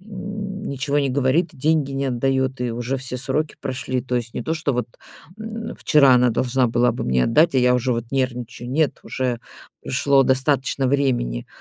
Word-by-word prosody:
Ничего 195 -8 -4
не 140 - +1
говорит 140 +6 +1
и - - -16
деньги 150 0 +1
не 135 0 -1
отдаёт. 130 +1 0
И 125 -1 -1
уже 120 +3 -2
все 125 -1 -4
сроки 140 +4 -2
прошли. 130 -1 -3
То 125 -1 -2
есть 115 -1 -4
не - - -3
то 160 - -1
что 155 -3 -1
вот, 125 -2 -1 0.5
м, 225 +1 -6
вчера 140 -4 +5
она 125 0 +4
должна 125 +2 +1
была 120 +1 +2
бы 120 - -4
мне 65 -1 +2
отдать, 155 +6 +3
а - - +4
я 125 0 +4
уже 125 +1 +1
вот 115 0 -2
нервничаю. 125 -2 -3
Нет, 150 +1 +1
уже 125 -2 -2 0.4
прошло 140 +1 +3
достаточно 135 0 +1
времени. 125 - 0
130 Hz, 185 wpm, -22 LUFS, 125-145 Hz, 0.5 s, вчера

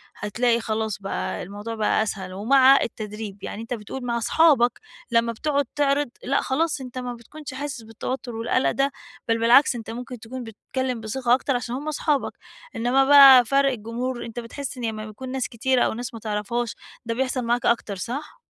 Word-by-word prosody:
هتلاقي 235 +3 +1
خلاص 220 -2 -2
بقى 195 - -3
الموضوع 205 +4 -6
بقى 220 0 +2
أسهل 190 -3 -5
ومع 265 +7 +5
التدريب، 210 -2 -6
يعني 215 - -5
أنتَ 230 +2 -5
بتقول 245 +3 -6
مع 235 -1 -1
أصحابك 250 0 +3 0.3
لما 230 0 +3
بتقعد 285 +4 0
تعرض 290 -1 +2
لأ، 275 - +1
خلاص 300 +2 0
أنتَ 255 -1 -8
ما 250 -1 -4
بتكونش 285 +5 -10
حاسس 270 -2 -5
بالتوتر 230 +2 -5
والقلق 230 +3 +1
ده، 275 +1 +1 0.4
بل 230 0 +2
بالعكس 240 +4 +5
أنتَ 225 -2 -7
ممكن 245 +1 -7
تكون 245 +3 -7
بتتكلم 250 +3 -4
بثقة 240 +3 0
أكتر 265 +1 +1
عشان 245 0 -3
هم 285 +4 -6
أصحابك. 300 -1 0 0.4
إنما 250 +4 +3
بقى 270 -3 +9
فرق 275 +2 +3
الجمهور 240 +2 -4
أنتَ 235 +1 -6
بتحس 255 +3 -6
إن 245 - -3
لما 215 -1 -4
بيكون 215 +5 -8
ناس 265 -1 -2
كتيرة 255 +1 +1
أو - - +2
ناس 245 +2 -6
ما 230 - -7
تعرفهاش 220 +2 -2 0.3
ده 230 - -1
بيحصل 255 +1 -1
معاك 240 +1 0
أكتر 225 -3 +1
صح؟ 250 +10 -6
240 Hz, 180 wpm, -24 LUFS, 225-265 Hz, 0.4 s, بقى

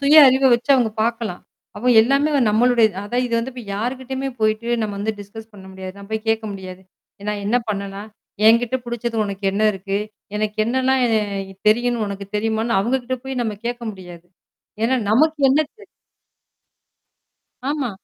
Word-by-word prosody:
சுய 285 +2 +5
அறிவ 265 +1 +2
வச்சு 240 +4 -2
அவங்க 245 -4 +2
பார்க்கலாம். 230 -5 -2 0.3
அப்ப 245 +4 +1
எல்லாமே 275 +6 +2
வ - - +4
நம்மளுடைய 235 +1 +4 0.2
அதான் 245 +5 -1
இது 235 - -2
வந்து 235 +3 -3
இப்ப 245 -1 -8
யார்கிட்டயுமே 260 +4 -3
போயி்ட்டு 215 +2 +1
நம்ம 210 -2 -3
வந்து 220 +2 -1
டிஸ்கஸ் 220 +2 -11
பண்ண 195 -2 -13
முடியாது. 190 0 -8
நான் 200 - -11
போய் 220 0 -3
கேட்க 225 0 +1
முடியாது. 190 -1 -9 0.4
ஏன்னா 210 +1 -2
என்ன 220 +5 +2
பண்ணலாம்? 200 0 -4 0.4
என்கிட்ட 235 +3 +4
புடிச்சது 235 -1 -3
உனக்கு 200 0 -6
என்ன 205 +2 0
இருக்கு? 195 +1 -3 0.4
எனக்கு 210 0 -2
என்னலாம் 260 +3 +1
என் 220 -2 +2 0.5
தெரியுன்னு 240 +1 +2
உனக்கு 200 0 -6
தெரியுமான்னு 220 +1 0
அவுங்ககிட்ட 250 +4 -1
போய் 265 -1 -3
நம்ம 215 -3 -3
கேட்க 240 0 -3
முடியாது. 180 -2 -12 0.6
ஏன்னா 250 +3 +3
நமக்கு 310 +7 +3
என்ன 280 +4 +4
தெரியும்? 420 -2 -17 1.8
ஆமா. 285 -4 -1
225 Hz, 160 wpm, -21 LUFS, 205-250 Hz, 1.8 s, சுய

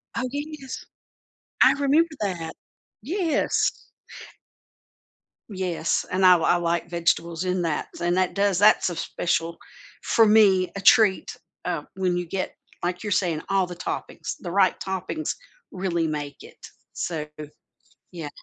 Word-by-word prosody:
Oh, 230 - -1
yes. 290 -2 -6 0.8
I - - +8
remember 285 +4 +3
that. 170 -5 -3 0.5
Yes. 325 - +1 1.8
Yes, 185 -5 -1
and 185 +1 +2
I 185 - +9
l 170 -2 +2
I 175 - +4
like 170 0 -1
vegetables 170 0 0
in 180 0 0
that, 165 -3 -1
and 175 +1 +1
that 185 -1 +1
does 200 -2 +1
that's 210 -2 +5
a 175 - -5
special 165 0 -2 0.4
for 225 - +4
me, 200 -4 +5
a 200 - -4
treat, 215 -5 +4 0.3
uh, 170 -4 -2
when 180 -2 0
you 175 - -2
get 185 +2 -3 0.3
like 180 0 -2
you're 210 - -3
saying, 175 -5 +1
all 195 -1 +2
the 175 - -8
toppings, 170 - -5
the 175 - -5
right 190 -1 +3
toppings 190 - -3 0.4
really 175 -3 -1
make 145 -2 -5
it, - - -14 0.4
so 160 -3 -3 0.9
Yeah. 165 -4 -6
185 Hz, 140 wpm, -24 LUFS, 170-205 Hz, 1.8 s, I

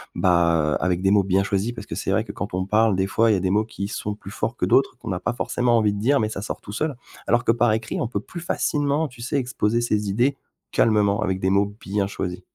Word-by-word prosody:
bah, 85 -4 +3
avec 90 0 0
des 95 - +3
mots 105 - +5
bien 95 +1 +2
choisis, 100 +4 -1
parce 120 - -8
que - - -7
c'est - - -3
vrai - - +2
que - - -7
quand - - -5
on 95 0 -1
parle 105 +1 +3
des 95 +1 +1
fois 115 +3 +2
il 105 - +4
y - - +1
a - - -1
des 95 0 0
mots 105 +2 +3
qui 100 -3 -5
sont 105 0 -4
plus 100 -1 -11
forts 110 +2 -3
que - - 0
d'autres, 135 -2 +2
qu'on 115 -5 -6
a 90 - -2
pas - - -2
forcément 120 0 +1
envie 105 -2 +2
de 100 - -4
dire, 140 +6 +3
mais 110 - 0
ça 100 -3 -5
sort 105 - -5
tout - - -9
seul. 145 +6 -2 0.3
Alors 120 +1 +3
que - - +5
par 120 0 +2
écrit, 110 0 -2
on - - 0
peut 105 -3 -2
plus 175 - -9
facilement, 150 -2 0
tu 125 -3 -14
sais 125 +4 -3
exposer 120 -3 0
ses 105 -3 0
idées 125 +7 +1 0.3
calmement, 105 -1 +3
avec 95 -3 -1
des 95 0 +1
mots 100 +1 +1
bien 100 0 -1
choisis. 90 -2 -4
105 Hz, 275 wpm, -23 LUFS, 95-120 Hz, 0.3 s, mots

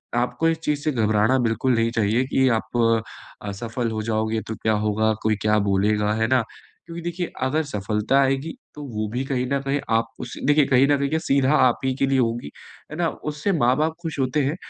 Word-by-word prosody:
आपको 125 +7 +1
इस 165 - 0
चीज़ 150 -2 0
से 155 - +1
घबराना 110 0 +2
बिल्कुल 115 +3 +1
नहीं 115 0 +1
चाहिए 115 +1 +1
कि 130 0 +4
आप 115 0 +1 0.4
असफल 115 +4 -3
हो 110 -1 -3
जाओगे 110 0 -1
तो 110 - -4
क्या 110 +1 0
होगा? 110 +1 +1
कोई 110 0 +2
क्या 105 0 +3
बोलेगा, 105 +2 +1
है 110 +1 0
ना? 130 -1 +2 0.4
क्योंकि 170 0 -7
देखिए, 175 +1 -3
अगर 150 +5 +1
सफलता 105 0 0
आएगी 135 +3 0 0.2
तो 150 - -8
वो 110 -2 -3
भी 125 +2 -1
कहीं 130 -2 -1
न 140 - +2
कहीं 140 +1 -1 0.2
आप 115 - +1
उसे 125 - -7
देखिए, 145 0 +4
कहीं 135 0 +4
न 145 - +3
कहीं 140 0 -1
क्या, 160 - 0
सीधा 140 -2 +2
आप 125 -5 +3
ही 130 - +1
के - - +5
लिए 135 -1 +2
होगी, 115 - -1 0.4
है 155 - -6
ना? 175 -1 +1
उससे 150 +6 -3
माँ 125 -6 +3
बाप 160 +1 0
खुश 160 -4 -5
होते 135 +3 +1
हैं, 145 +4 -1
125 Hz, 215 wpm, -23 LUFS, 110-145 Hz, 0.4 s, के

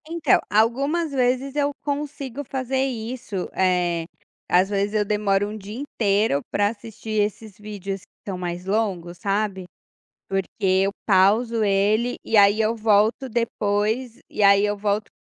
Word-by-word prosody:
Então, 335 -1 +3
algumas 275 +10 +1
vezes 260 +1 0
eu 290 -1 +1
consigo 285 -2 -4
fazer 265 0 -2
isso, 235 -5 -4
eh, 175 -3 +1 0.4
às 180 +2 +4
vezes, 200 0 -1
eu 210 -1 +2
demoro 205 -1 +1
1 215 - -6
dia 210 +3 -8
inteiro 205 - +1
pra 205 0 +2
assistir 220 -1 -4
esses 210 0 -3
vídeos 200 -2 -6
que - - -21
estão 195 - -5
mais 180 0 -5
longos, 190 -4 -1
sabe. 195 -1 -1 0.6
Porque 195 -1 -1
eu 190 +1 +3
pauso 215 +4 +3
ele 210 +4 +2
e 225 - +2
aí 205 +1 +6
eu 220 +1 +1
volto 220 +3 +2
depois 220 +1 -1
e - - -4
aí 200 0 +6
eu 205 0 0
volto 205 +1 -1
210 Hz, 145 wpm, -23 LUFS, 195-235 Hz, 0.6 s, aí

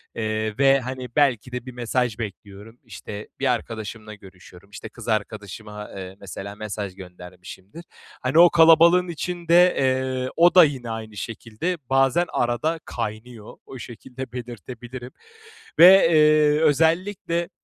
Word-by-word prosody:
eee, 110 -1 -3
ve, 135 0 +4
hani, 130 0 -6
belki 130 -4 +1
de 125 0 -6
bir 130 - -8
mesaj 120 -1 -2
bekliyorum, 105 +2 -9
işte, 105 -2 -9
bir 140 - 0
arkadaşımla 110 -1 -7
görüşüyorum, 95 -1 -17
işte, 105 +1 -10
kız 115 0 -13
arkadaşıma, 105 -1 -5
eee, 95 0 -8
mesela 100 +1 -8
mesaj 105 -2 -6
göndermişimdir. 90 - -12 0.4
Hani, 130 +6 +2
o 175 0 +8
kalabalığın 170 +2 +5
içinde, 175 +1 +2
eee, 130 -1 -1
o 175 +2 +4
da 180 - +9
yine 130 -5 -2
aynı 110 -2 -7
şekilde 115 - -5
bazen 135 +5 +2
arada 140 +8 -1
kaynıyor. 110 -1 -7
O 130 - -10
şekilde 125 +2 -9
belirtebilirim 125 +1 -9 0.7
ve, 175 - +10 0.3
eee, 150 -1 +4
özellikle, 170 +3 0
120 Hz, 130 wpm, -23 LUFS, 105-150 Hz, 0.7 s, ve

